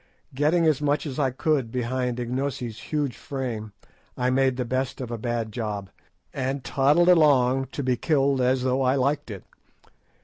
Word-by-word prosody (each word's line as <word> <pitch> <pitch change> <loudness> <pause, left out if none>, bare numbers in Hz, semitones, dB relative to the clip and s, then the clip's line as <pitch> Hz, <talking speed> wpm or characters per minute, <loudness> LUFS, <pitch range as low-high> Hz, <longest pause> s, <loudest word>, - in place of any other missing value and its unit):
Getting 155 +5 +2
as 150 -3 +2
much 145 +1 +1
as 140 -1 -5
I 135 -2 +2
could 130 -2 0
behind 125 0 -2
Ignosi's 125 -2 -3
huge 145 -4 -1
frame, 125 -8 -5 0.5
I 125 +1 +1
made 130 -1 +2
the 125 - -1
best 130 +2 -2
of 125 -3 -5
a 120 - -3
bad 115 -1 -2
job, 105 -4 -4 0.4
and 135 0 -2
toddled 145 +7 +3
along 135 -6 +4
to 140 - -3
be 125 -1 +1
killed 140 -2 +1
as 125 0 +2
though 130 +1 +1
I 130 0 +2
liked 140 0 0
it. 100 -3 -7
130 Hz, 170 wpm, -25 LUFS, 125-140 Hz, 0.5 s, along